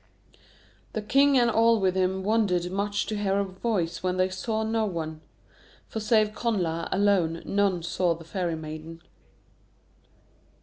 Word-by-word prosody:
The 215 Hz, -, -3 dB
king 275 Hz, +5 st, +4 dB
and 240 Hz, -1 st, +4 dB
all 230 Hz, 0 st, +4 dB
with 190 Hz, -2 st, +1 dB
him 190 Hz, 0 st, 0 dB
wondered 190 Hz, -5 st, +1 dB
much 205 Hz, +1 st, -1 dB
to 215 Hz, -, -3 dB
hear 200 Hz, -1 st, 0 dB
a 200 Hz, -, +2 dB
voice 190 Hz, -2 st, -2 dB
when 185 Hz, 0 st, -1 dB
they 185 Hz, 0 st, +2 dB
saw 220 Hz, +4 st, -2 dB
no 220 Hz, 0 st, 0 dB
one. 160 Hz, -6 st, -4 dB, 0.7 s
For 220 Hz, -, -4 dB
save 215 Hz, -1 st, +2 dB
Connla 180 Hz, -8 st, -1 dB
alone, 190 Hz, -5 st, +2 dB
none 195 Hz, -4 st, +1 dB
saw 170 Hz, 0 st, 0 dB
the 165 Hz, -, -12 dB
Fairy 175 Hz, -2 st, -2 dB
Maiden. 160 Hz, +1 st, -8 dB
190 Hz, 145 wpm, -26 LUFS, 175-215 Hz, 0.7 s, king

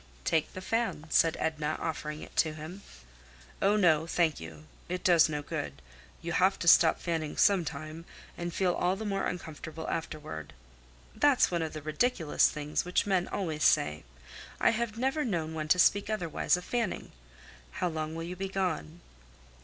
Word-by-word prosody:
"Take 160 Hz, -, +1 dB
the 185 Hz, -, -7 dB
fan," 225 Hz, -6 st, -1 dB
said 165 Hz, -1 st, +4 dB
Edna, 155 Hz, -1 st, -1 dB
offering 150 Hz, -1 st, -4 dB
it -, -, -13 dB
to 160 Hz, -1 st, +3 dB
him. 160 Hz, +6 st, -8 dB, 0.8 s
"Oh, 200 Hz, +2 st, +4 dB
no! 165 Hz, -6 st, +3 dB
Thank 165 Hz, -3 st, +1 dB
you. 80 Hz, -2 st, -10 dB, 0.2 s
It 180 Hz, 0 st, -3 dB
does 170 Hz, -3 st, +5 dB
no 150 Hz, -1 st, -3 dB
good; 70 Hz, -, -5 dB, 0.4 s
you 170 Hz, -, -3 dB
have 190 Hz, +3 st, +3 dB
to 170 Hz, -, -4 dB
stop 165 Hz, -1 st, +6 dB
fanning 160 Hz, -3 st, -3 dB
some 195 Hz, -3 st, +4 dB
time, 155 Hz, +2 st, -7 dB, 0.3 s
and 175 Hz, 0 st, -4 dB
feel 180 Hz, +1 st, +1 dB
all 180 Hz, +2 st, +1 dB
the 220 Hz, +3 st, -6 dB
more 195 Hz, -1 st, -1 dB
uncomfortable 160 Hz, -2 st, -6 dB
afterward." 150 Hz, -, -5 dB, 0.6 s
"That's 285 Hz, -8 st, +4 dB
one 170 Hz, -1 st, 0 dB
of 160 Hz, -1 st, -3 dB
the 155 Hz, -2 st, -7 dB
ridiculous 160 Hz, +1 st, +2 dB
things 150 Hz, 0 st, -2 dB
which 180 Hz, +1 st, +1 dB
men 185 Hz, -3 st, +1 dB
always 160 Hz, -6 st, -3 dB
say. 75 Hz, 0 st, +3 dB, 0.6 s
I -, -, +4 dB
have 225 Hz, -1 st, -2 dB
never 270 Hz, +5 st, 0 dB
known 165 Hz, -, -2 dB
one 155 Hz, -1 st, -3 dB
to 180 Hz, -, +4 dB
speak 200 Hz, +3 st, +4 dB
otherwise 180 Hz, -4 st, 0 dB
of 180 Hz, -, -8 dB
fanning. 235 Hz, -5 st, -2 dB, 0.6 s
How -, -, -1 dB
long 155 Hz, -1 st, -3 dB
will 165 Hz, -, -4 dB
you 175 Hz, +2 st, -5 dB
be 190 Hz, +1 st, -4 dB
gone?" 175 Hz, -3 st, -2 dB
165 Hz, 175 wpm, -30 LUFS, 155-190 Hz, 0.8 s, stop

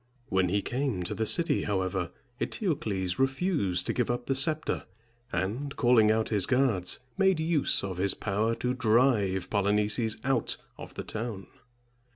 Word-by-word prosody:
When 95 Hz, -1 st, +2 dB
he 100 Hz, +2 st, 0 dB
came 125 Hz, -8 st, -2 dB
to -, -, -3 dB
the 110 Hz, -, -2 dB
city, 170 Hz, +6 st, +2 dB
however, 95 Hz, -3 st, -1 dB, 0.3 s
Eteocles 105 Hz, -, -2 dB
refused 135 Hz, -, +1 dB
to -, -, -1 dB
give 125 Hz, -1 st, 0 dB
up 120 Hz, 0 st, -2 dB
the 135 Hz, -, 0 dB
scepter, 155 Hz, +3 st, +1 dB, 0.5 s
and, 115 Hz, +11 st, -2 dB
calling 120 Hz, -3 st, +4 dB
out 110 Hz, 0 st, +1 dB
his 100 Hz, -4 st, +3 dB
guards, 120 Hz, -8 st, +2 dB, 0.2 s
made 190 Hz, -4 st, +3 dB
use 160 Hz, -7 st, +2 dB
of 95 Hz, -2 st, -4 dB
his 100 Hz, +1 st, +1 dB
power 110 Hz, +3 st, -1 dB
to 125 Hz, +1 st, -1 dB
drive 110 Hz, -6 st, +2 dB
Polynices 105 Hz, +2 st, +1 dB
out 135 Hz, +1 st, 0 dB, 0.2 s
of -, -, -11 dB
the -, -, -5 dB
town. 110 Hz, -3 st, -5 dB
110 Hz, 155 wpm, -28 LUFS, 95-135 Hz, 0.5 s, calling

